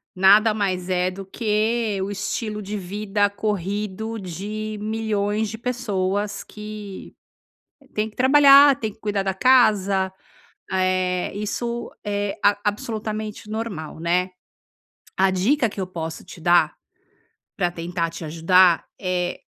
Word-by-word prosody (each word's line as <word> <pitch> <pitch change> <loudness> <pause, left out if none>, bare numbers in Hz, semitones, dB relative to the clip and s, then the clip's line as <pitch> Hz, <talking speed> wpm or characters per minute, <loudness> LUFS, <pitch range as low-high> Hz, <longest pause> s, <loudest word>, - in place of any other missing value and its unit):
nada 205 +4 +6
mais 185 -3 -2
é 180 0 +1
do 195 +1 -8
que 215 0 0
o 195 - -2
estilo 210 +2 -3
de 205 +1 -4
vida 205 +2 -1
corrido 210 +2 -3
de 210 +4 -5
milhões 215 -1 -1
de 225 - -6
pessoas 205 -5 -2
que, 210 -2 -9 0.8
tem 215 +1 -1
que - - -23
trabalhar, 280 +1 +7
tem 220 -1 -2
que - - -28
cuidar 205 -2 -1
da 190 -1 -1
casa, 200 -5 +3 0.6
eh, 185 -1 0
isso 235 +3 -3
é 205 -1 -2
ab 205 0 +4
absolutamente 215 0 -3
normal, 215 -9 -5
né? 180 +2 +1 0.9
A 190 0 +4
dica 230 +7 +2
que 200 - -6
eu 185 - -2
posso 165 -3 -6
te 170 - -12
dar, 175 -1 +4 0.8
pra 175 -3 +1
tentar 170 0 -3
te 165 0 -8
ajudar 170 +2 +4
é 180 -2 -2
205 Hz, 130 wpm, -23 LUFS, 185-215 Hz, 0.9 s, trabalhar